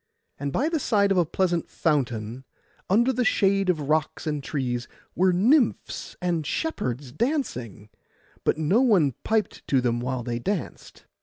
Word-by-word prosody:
And 140 0 -2
by 275 - +1
the 325 -1 0
side 200 -6 +2
of 195 - +3
a 170 - +2
pleasant 175 -1 0
fountain, 125 -5 -1 0.5
under 235 +7 +3
the 250 +1 +1
shade 195 -4 +2
of 165 -4 +1
rocks 155 0 0
and 150 -2 -2
trees, 125 -5 -2 0.3
were 185 +2 +3
nymphs 235 - +1
and 175 -3 -1
shepherds 140 - -3
dancing; 125 - -2 0.5
but - - +1
no 160 +10 +3
one 190 - +4
piped 220 -1 0
to 135 - +3
them 120 -1 0
while 125 0 -3
they 120 0 -3
danced. 190 +7 -5
160 Hz, 155 wpm, -25 LUFS, 130-210 Hz, 0.5 s, one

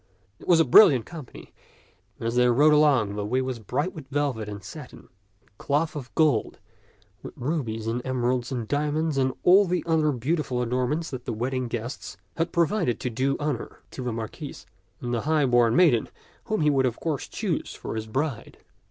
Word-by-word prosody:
It - - -14
was 175 -2 +5
a 165 - +5
brilliant 135 - +7
company, 155 -8 -11 0.6
and 115 - -4
as 115 - -2
they 125 0 +4
rode 145 +6 +5
along 140 -9 +4
the 105 0 -3
way 120 +5 0
was 130 -2 -3
bright 125 - -2
with 155 -6 -10
velvet 135 -6 -2
and 100 -2 -8
satin - - -11 0.3
and 100 - -35
cloth 150 +3 0
of 130 -5 -6
gold, 150 -9 +2 0.6
with - - -10
rubies 120 -6 -3
and 115 +2 -1
emeralds 125 -1 -1
and 120 -4 -3
diamonds 150 +1 0
and 130 0 +2
all 195 +3 +6
the 180 0 -1
other 160 -2 +2
beau 140 +6 -1
tiful 125 -5 -2
adornments 130 +7 -1
that 130 -2 -6
the 120 - -3
wedding 125 +3 -2
guests 120 +2 -6 0.2
had 165 +1 -1
pro 170 -1 +3
vided 170 - -1
to 125 - -4
do 130 +4 0
honor 145 -5 -3
to - - -7
the 125 - -2
Marquis 110 -1 -7 0.4
and 120 0 -3
the 115 - 0
high 155 +1 +2
born 120 -2 +3
maiden 155 -10 +4 0.4
whom 215 -5 -1
he 150 -1 +4
would 135 -2 +2
of 120 - -4
course 155 -4 -3
choose - - -3
for - - -6
his 110 0 -4
bride. 135 +2 -3
130 Hz, 195 wpm, -25 LUFS, 120-155 Hz, 0.6 s, brilliant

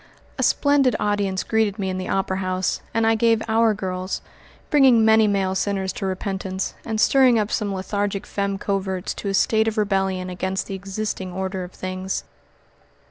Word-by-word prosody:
A - - +1
splendid 280 -5 +3
audience 205 -2 0
greeted 220 -2 +1
me 195 -3 -2
in 185 - -3
the 185 - -5
Opera 190 -1 0
House, 185 0 -1
and 225 0 +1
I 225 - +4
gave 225 0 +2
"Our 220 -1 +3
Girls," 185 -1 -4 0.5
bringing 260 -6 +6
many 220 0 +5
male 195 -2 +1
sinners 190 0 -1
to 195 - -3
repentance, 190 0 -3
and 220 -1 -3
stirring 260 -1 +5
up 215 0 0
some 205 -2 -1
lethargic 200 +1 -2
femmes 200 -1 -2
coverts 190 -2 -2
to - - -6
a 195 - 0
state 220 +3 +3
of 220 0 -1
rebellion 195 -3 0
against 185 +1 -2
the - - -6
existing 195 0 -4
order 190 0 -3
of 180 - -10
things. 185 0 -4
195 Hz, 175 wpm, -23 LUFS, 190-220 Hz, 0.5 s, bringing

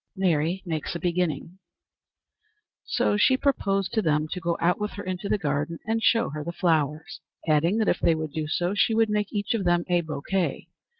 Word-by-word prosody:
Mary 175 -1 +1
makes 160 -1 -3
a - - -3
Beginning. 175 +1 -2 1.3
So 205 - +1
she 260 +5 +4
proposed 195 -9 0
to 220 - +2
them 155 -3 +1
to 180 - -4
go 170 -1 -1
out 175 +4 +1
with 210 - -2
her 205 - -6
into 185 +1 -4
the - - +2
garden 150 -1 -2
and 225 +1 0
show 230 -2 +3
her 150 0 -5
the 170 - -4
flowers, 160 -3 -1 0.3
adding 160 +6 +3
that 220 - +1
if - - +2
they 165 - +3
would 155 -1 -4
do 155 +1 -3
so 175 +4 0
she 220 +2 +2
would 225 -1 +3
make 210 -1 0
each 205 +1 -1
of 225 -4 -1
them 175 -1 +2
a 175 -1 +3
bouquet. 165 +4 -2
175 Hz, 200 wpm, -26 LUFS, 160-205 Hz, 1.3 s, she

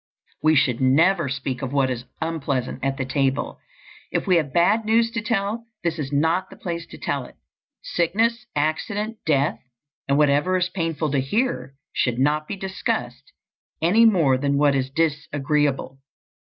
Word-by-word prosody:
We 155 0 +4
should 135 -4 +2
never 160 +5 +3
speak 130 -1 -3
of 135 -2 -3
what 135 -2 +2
is 125 0 -5 0.2
unpleasant 140 -7 -2
at 135 0 0
the 130 - -2
table. 135 +1 -1 0.5
If - - -1
we 185 -3 +4
have 150 -4 -1
bad 200 +8 +3
news 230 +1 +2
to 230 -1 -2
tell, 225 0 -2 0.2
this 170 -1 -1
is 140 -2 -4
not 160 +6 +1
the - - -12
place 170 -1 -5
to - - -11
tell - - -2
it. - - -15 0.5
Sickness, 230 - 0
accident, 205 +9 -1
death, 145 -1 +2 0.5
and 140 +1 +2
whatever 150 +5 +3
is 180 0 0
painful 165 -4 -2
to 140 - +2
hear, 135 - -1 0.2
should 120 -2 0
not 150 +3 +1
be - - -4
discussed 140 -9 -4 0.5
any 205 +8 +4
more 160 - +4
than 140 0 +1
what 145 0 +4
is 135 -1 0
disagreeable. 145 -2 0
150 Hz, 165 wpm, -23 LUFS, 135-185 Hz, 0.5 s, We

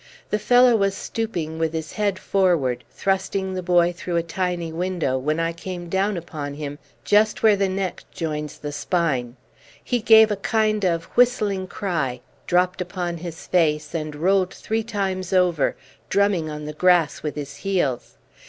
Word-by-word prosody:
The 210 - +1
fellow 245 +2 +5
was 195 -2 +1
stooping 170 -9 -4
with 160 0 0
his 160 -2 -4
head 205 -3 0
forward 170 -12 +1
thrusting 190 0 -1
the 185 - -3
boy 175 -1 +3
through 175 0 -4
a 170 - +2
tiny 175 -1 -2
window, 175 -5 -1
when 155 +4 -1
I 165 0 0
came 175 0 -7
down 190 +2 0
upon 150 -4 -6
him 145 -1 -6 0.3
just 210 +1 +3
where 215 -2 +6
the 195 -1 +1
neck 190 -1 -3
joins 150 -2 -4
the 145 - -6
spine. 145 -7 -1 0.5
He 245 - 0
gave 220 0 +7
a 205 - 0
kind 215 +1 +1
of 170 -3 +1
whistling 210 -6 +2
cry, 150 - -2 0.3
dropped 180 +1 +2
upon 175 -1 -3
his 165 -1 -8
face, 150 -3 +1
and 155 -2 -3
rolled 185 +4 +2
three 220 +1 -2
times 195 -4 -3
over, 180 -6 +2 0.3
drumming 200 -6 +2
on 150 0 -6
the 150 - -5
grass 175 -1 +3
with 150 - -4
his 140 -1 -6
heels. 175 -11 -1
180 Hz, 165 wpm, -23 LUFS, 155-195 Hz, 0.5 s, gave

